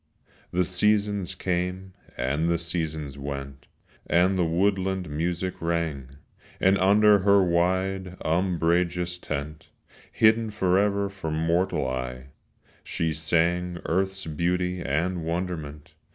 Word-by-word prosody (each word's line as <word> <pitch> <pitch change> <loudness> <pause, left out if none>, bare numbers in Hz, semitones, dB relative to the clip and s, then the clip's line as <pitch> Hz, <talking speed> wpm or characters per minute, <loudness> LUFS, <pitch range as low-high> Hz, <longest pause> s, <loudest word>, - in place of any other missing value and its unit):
The 90 +1 +1
seasons 100 +1 +1
came 90 +1 -2 0.2
and 70 +7 0
the 85 - +2
seasons 80 -4 -4
went 70 -1 -6 0.4
And 90 +4 +3
the 90 - +2
woodland 95 +1 0
music 90 +4 -2
rang; 85 -6 -2 0.5
And 95 +1 +4
under 105 +2 +5
her 100 0 +4
wide 95 +1 0
umbrageous 85 +1 +1
tent, 75 -1 -5 0.4
Hidden 110 0 +3
forever 100 0 +1
from 95 -6 -5
mortal 85 -2 +1
eye, 65 0 -5 0.5
She 80 -1 -2
sang 85 +3 +1
earth's 95 +2 -1
beauty 90 +3 -1
and 85 +5 -1
wonderment. 80 -3 -4
90 Hz, 110 wpm, -26 LUFS, 80-95 Hz, 0.5 s, under